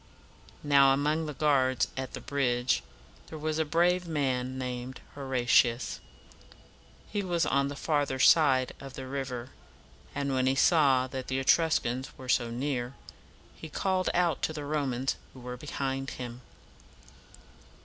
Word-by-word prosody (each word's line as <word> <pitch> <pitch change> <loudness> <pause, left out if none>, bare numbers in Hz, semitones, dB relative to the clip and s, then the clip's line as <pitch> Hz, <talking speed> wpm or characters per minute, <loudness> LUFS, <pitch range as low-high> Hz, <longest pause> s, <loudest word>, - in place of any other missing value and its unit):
Now, 140 -2 +5
among 155 +3 0
the 150 - -6
guards 130 -4 +2
at 130 -1 -5
the - - -6
bridge, 125 -3 0 0.5
there 160 - -8
was 155 +1 -2
a - - +3
brave 175 +3 +2
man 130 -4 -1
named 125 0 -5
Ho 145 - -9
ra´ti 125 -2 +3
us. 125 - -6 1.1
He 205 - -1
was 175 -3 0
on 140 0 +1
the 140 - -5
farther 145 -3 0
side 130 -2 +4
of 135 -1 -9
the 130 - -6
river, 130 -2 -5 0.6
and 140 -1 -1
when 130 0 +1
he 130 - +2
saw 135 -4 +4
that 130 0 -6
the 130 - -1
Etruscans 135 -3 +1
were 130 -1 -10
so 120 -2 +2
near, 125 +1 -3 0.6
he 160 - -9
called 185 +3 0
out 175 -4 +2
to 155 - -1
the 150 -2 -5
Romans 135 -3 -1 0.2
who - - -11
were 125 0 -6
behind 135 0 -3
him. 125 -1 -7
135 Hz, 150 wpm, -29 LUFS, 130-150 Hz, 1.1 s, Now